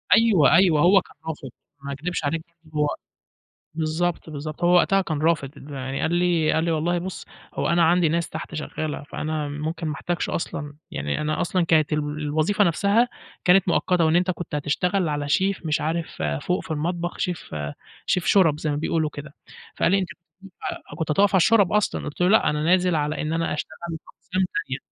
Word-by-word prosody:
أيوه 195 Hz, -, +5 dB
أيوه، 170 Hz, -5 st, +5 dB
هو 195 Hz, +3 st, +6 dB
كان -, -, -19 dB
رافِض، 150 Hz, -4 st, -5 dB, 0.3 s
ما 140 Hz, -, -5 dB
أكدِبش 160 Hz, +3 st, -3 dB
عليك 160 Hz, +3 st, -1 dB, 0.2 s
برضو 155 Hz, -1 st, -9 dB
هو 145 Hz, -, +1 dB, 0.8 s
بالضبط، 160 Hz, +2 st, -1 dB
بالضبط، 155 Hz, +2 st, -6 dB
هو 175 Hz, +1 st, +5 dB
وقتها 195 Hz, +2 st, +4 dB
كان 155 Hz, -5 st, -3 dB
رافِض، 150 Hz, -3 st, -1 dB
يعني 135 Hz, 0 st, -4 dB
قال 160 Hz, -, 0 dB
لي 175 Hz, -3 st, +2 dB
قال 160 Hz, -, +1 dB
لي: 170 Hz, -, 0 dB
"والله 170 Hz, +3 st, +1 dB
بُص 185 Hz, +1 st, -6 dB, 0.3 s
هو -, -, -1 dB
أنا 170 Hz, 0 st, +3 dB
عندي 170 Hz, 0 st, +4 dB
ناس 170 Hz, 0 st, 0 dB
تحت 160 Hz, 0 st, -6 dB
شغَّالة، 155 Hz, -1 st, -4 dB
فأنا 155 Hz, 0 st, -3 dB
ممكن 155 Hz, +3 st, -4 dB
ما 150 Hz, -, -1 dB
أحتاجش 175 Hz, +4 st, -2 dB
أصلًا." 145 Hz, -3 st, -4 dB, 0.2 s
يعني 70 Hz, -, -2 dB
أنا 155 Hz, 0 st, -1 dB
أصلًا 180 Hz, 0 st, +1 dB
كانت 155 Hz, -2 st, +3 dB
ال 150 Hz, -, +2 dB
الوظيفة 150 Hz, +6 st, 0 dB
نفْسها 200 Hz, +7 st, +3 dB, 0.4 s
كانت 185 Hz, +1 st, +5 dB
مؤقَّتة، 175 Hz, -1 st, +2 dB
وإن 160 Hz, +1 st, +3 dB
أنتَ 180 Hz, +1 st, +3 dB
كنت 170 Hz, -4 st, -6 dB
هتشتغَل 170 Hz, +4 st, 0 dB
على 145 Hz, -1 st, -2 dB
شيف 190 Hz, +2 st, +1 dB
مش 155 Hz, 0 st, 0 dB
عارف 160 Hz, -, -3 dB, 0.2 s
فوق 180 Hz, -, -1 dB
في -, -, -8 dB
المطبخ، 170 Hz, +3 st, -2 dB
شيف 175 Hz, -, -3 dB, 0.5 s
شيف 180 Hz, -, 0 dB
شُرَب 165 Hz, -7 st, +4 dB
زي 155 Hz, -, -2 dB
ما 145 Hz, -, 0 dB
بيقولوا 155 Hz, +1 st, 0 dB
كده. 145 Hz, 0 st, -9 dB, 0.4 s
فقال -, -, +2 dB
لي: 195 Hz, -, +4 dB
"أنتَ 185 Hz, -, -3 dB, 0.3 s
كنت 195 Hz, -1 st, -13 dB, 0.5 s
كنت 160 Hz, -1 st, -1 dB
هتقِف 200 Hz, +4 st, +3 dB
على -, -, +6 dB
الشُرَب 200 Hz, +1 st, +4 dB
أصلًا." 210 Hz, -1 st, +1 dB
قُلت 150 Hz, +4 st, -6 dB
له: 180 Hz, -, +4 dB
"لأ 220 Hz, -, +4 dB
أنا 150 Hz, 0 st, -1 dB
نازِل 180 Hz, +1 st, +3 dB
على 150 Hz, +1 st, -1 dB
إن 155 Hz, +1 st, -2 dB
أنا 165 Hz, -1 st, 0 dB
أشتغَل 155 Hz, +1 st, -5 dB
في 165 Hz, -, -3 dB
أقسام 185 Hz, +1 st, -2 dB
تانية." 135 Hz, +1 st, -2 dB
160 Hz, 195 wpm, -24 LUFS, 150-180 Hz, 0.8 s, هو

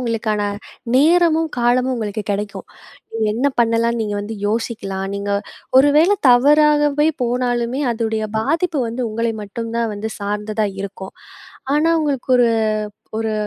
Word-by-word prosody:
உங்களுக்கான 225 Hz, -3 st, -1 dB, 0.5 s
நேரமும், 325 Hz, +2 st, +4 dB
காலமும் 250 Hz, +2 st, +2 dB
உங்களுக்கு 215 Hz, -2 st, -3 dB
கிடைக்கும். 200 Hz, -1 st, -5 dB, 0.5 s
நீங்க 225 Hz, -1 st, 0 dB
என்ன 250 Hz, +5 st, 0 dB
பண்ணலான்னு 230 Hz, 0 st, +1 dB
நீங்க 210 Hz, -1 st, -3 dB
வந்து 210 Hz, +2 st, -6 dB
யோசிக்கலாம். 205 Hz, -3 st, -3 dB
நீங்க 200 Hz, 0 st, -3 dB, 0.5 s
ஒருவேள 295 Hz, +6 st, +5 dB, 0.2 s
தவறாகவே 295 Hz, +3 st, +4 dB
போனாலுமே 245 Hz, +1 st, -1 dB
அதுடைய 220 Hz, -1 st, -2 dB
பாதிப்பு 325 Hz, +7 st, 0 dB
வந்து 235 Hz, +3 st, -4 dB
உங்களை 230 Hz, +1 st, -1 dB
மட்டும் 225 Hz, +3 st, -6 dB
தான் 230 Hz, -1 st, 0 dB
வந்து 215 Hz, +2 st, -5 dB
சார்ந்ததா 210 Hz, +1 st, -2 dB
இருக்கும். 195 Hz, -1 st, -7 dB, 0.6 s
ஆனா 305 Hz, +2 st, +2 dB
உங்களுக்கு 280 Hz, -5 st, -2 dB
ஒரு, 245 Hz, -1 st, +4 dB, 0.7 s
ஒரு 220 Hz, 0 st, -1 dB
230 Hz, 125 wpm, -19 LUFS, 215-270 Hz, 0.7 s, ஒருவேள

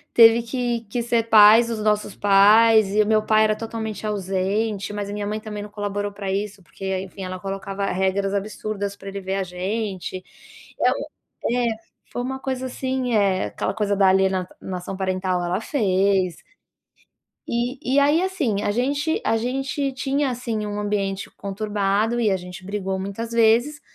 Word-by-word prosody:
teve 230 Hz, 0 st, +8 dB
que 240 Hz, -1 st, -2 dB
que 240 Hz, +3 st, -2 dB
ser 235 Hz, -1 st, +1 dB
pais 220 Hz, +2 st, +8 dB
dos 230 Hz, -1 st, -3 dB
nossos 210 Hz, -1 st, 0 dB
pais, 210 Hz, +1 st, +5 dB
e 215 Hz, -, +5 dB
o -, -, -4 dB
meu 215 Hz, 0 st, +3 dB
pai 215 Hz, 0 st, +4 dB
era 215 Hz, 0 st, +2 dB
totalmente 220 Hz, -1 st, -5 dB
ausente, 200 Hz, +1 st, -1 dB
mas 205 Hz, -1 st, -3 dB
a -, -, -5 dB
minha 205 Hz, 0 st, -3 dB
mãe 210 Hz, +1 st, -2 dB
também 215 Hz, -1 st, -6 dB
não 210 Hz, -, -9 dB
colaborou 205 Hz, -1 st, -3 dB
pra 200 Hz, -1 st, -5 dB
isso, 200 Hz, 0 st, -3 dB
porque 190 Hz, +5 st, -4 dB
enfim, 195 Hz, 0 st, -8 dB
ela 185 Hz, 0 st, -5 dB
colocava 195 Hz, +1 st, -4 dB
regras 195 Hz, +1 st, 0 dB
absurdas 205 Hz, 0 st, -3 dB
pra 195 Hz, 0 st, -9 dB
ele 200 Hz, 0 st, -6 dB
ver 190 Hz, +1 st, -3 dB
a 195 Hz, -, 0 dB
gente, 185 Hz, 0 st, -4 dB, 0.6 s
eh, -, -, +4 dB, 0.6 s
um -, -, +1 dB
eh, 240 Hz, -, +1 dB, 0.4 s
foi 245 Hz, -, -3 dB
uma 265 Hz, +1 st, -4 dB
coisa 260 Hz, -1 st, -3 dB
assim, 260 Hz, -1 st, -2 dB
eh, 195 Hz, -3 st, +2 dB
aquela -, -, -3 dB
coisa 205 Hz, -2 st, 0 dB
da 195 Hz, -1 st, +4 dB
aliena 190 Hz, -1 st, +2 dB
alienação 185 Hz, 0 st, -5 dB
parental 185 Hz, -1 st, -1 dB
ela 180 Hz, +4 st, -1 dB
fez. 195 Hz, -, +1 dB, 1.0 s
E 245 Hz, +3 st, -2 dB, 0.2 s
e -, -, +6 dB
aí 295 Hz, +4 st, +4 dB
assim, 300 Hz, -, -1 dB
a 205 Hz, -, 0 dB
gente 285 Hz, +7 st, 0 dB
a -, -, +2 dB
gente 270 Hz, +4 st, -2 dB
tinha 275 Hz, +2 st, 0 dB
assim 235 Hz, -3 st, -3 dB
um 205 Hz, 0 st, -4 dB
ambiente 200 Hz, -2 st, -2 dB
conturbado 205 Hz, +2 st, -1 dB
e 225 Hz, -3 st, +2 dB
a 190 Hz, -, +1 dB
gente 180 Hz, +1 st, -10 dB
brigou 195 Hz, -1 st, -3 dB
muitas 200 Hz, +4 st, -5 dB
vezes, 235 Hz, +6 st, +3 dB
210 Hz, 175 wpm, -23 LUFS, 195-230 Hz, 1.0 s, teve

